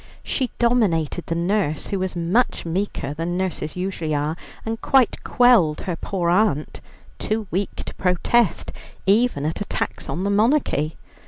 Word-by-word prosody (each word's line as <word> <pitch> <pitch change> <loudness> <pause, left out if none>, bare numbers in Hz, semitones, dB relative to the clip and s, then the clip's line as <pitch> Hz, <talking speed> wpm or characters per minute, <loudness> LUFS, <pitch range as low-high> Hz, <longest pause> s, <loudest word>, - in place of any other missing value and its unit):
She 260 -3 -1
dominated 190 - +1
the 165 - -1
nurse, 170 -3 0
who 200 - -1
was 185 0 -2
much 175 +8 +1
meeker 170 -5 -2
than 165 +3 -2
nurses 180 -5 -3
usually 180 -4 -2
are, 150 +2 -1 0.3
and 225 0 -3
quite 265 -4 +3
quelled 235 -12 +4
her 180 - -3
poor 175 -1 -1
aunt, 175 -6 +1 0.4
too 215 0 -1
weak 190 +3 -1
to - - -7
protest 185 +3 +1 0.3
even 200 -6 +3
at 160 +6 -2
attacks 205 - -3
on 180 - -2
the 200 - +1
monarchy. 210 - +2
185 Hz, 150 wpm, -22 LUFS, 165-215 Hz, 0.4 s, quelled